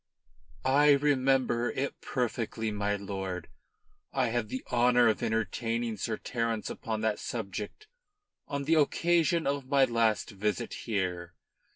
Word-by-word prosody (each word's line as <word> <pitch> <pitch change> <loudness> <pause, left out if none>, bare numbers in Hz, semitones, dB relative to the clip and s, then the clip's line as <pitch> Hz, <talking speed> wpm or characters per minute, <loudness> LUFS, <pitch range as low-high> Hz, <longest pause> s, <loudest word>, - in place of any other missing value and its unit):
"I 145 +2 +6
remember 135 -4 +2
it 140 +1 -3
perfectly, 115 -3 -2
my 105 0 0
lord. 95 -3 -5 0.6
I 130 -3 +1
had 115 -2 -1
the 130 - -4
honour 120 0 +5
of 110 - 0
entertaining 115 +1 -1
Sir 110 +3 -2
Terence 115 -3 -2
upon 110 -1 -4
that 110 -1 0
subject 105 - -5 0.6
on 140 -2 -3
the 155 +4 +2
occasion 165 +2 +3
of 140 -1 -1
my 140 -1 +5
last 115 -3 +1
visit 105 -1 -2
here." 90 -5 -3
115 Hz, 130 wpm, -30 LUFS, 105-135 Hz, 0.6 s, I